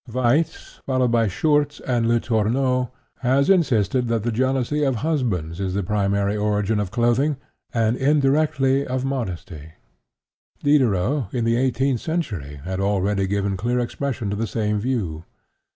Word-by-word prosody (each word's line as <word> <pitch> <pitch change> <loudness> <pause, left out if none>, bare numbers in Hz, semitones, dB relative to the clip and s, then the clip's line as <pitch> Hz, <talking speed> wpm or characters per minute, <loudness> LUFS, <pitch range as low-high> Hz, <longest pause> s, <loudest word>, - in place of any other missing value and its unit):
Waitz, 130 +6 0
followed 130 -2 +1
by 115 -2 +3
Schurtz 145 - +1
and 120 -3 0
Letourneau, 120 +2 +1 0.3
has 135 +6 +3
insisted 125 - +2
that 115 -2 0
the 120 - 0
jealousy 130 +4 0
of 135 -3 +1
husbands 100 - -1
is 95 -1 -2
the 100 - 0
primary 100 +1 0
origin 105 0 0
of 100 -3 -2
clothing, 120 +6 +1 0.3
and, 115 0 +1
indirectly, 140 -1 +2
of 130 -1 -2
modesty. 90 - -5 0.9
Diderot 130 -4 +2
in 120 -2 0
the 115 0 +2
eighteenth 130 0 +1
century 95 - -4
had 95 +1 -4
already 100 0 +1
given 100 0 -1
clear 120 +6 -1
expression 125 -3 -2
to - - -1
the 110 +2 -2
same 105 -2 -1
view. 100 -10 -2
120 Hz, 140 wpm, -22 LUFS, 100-135 Hz, 0.9 s, by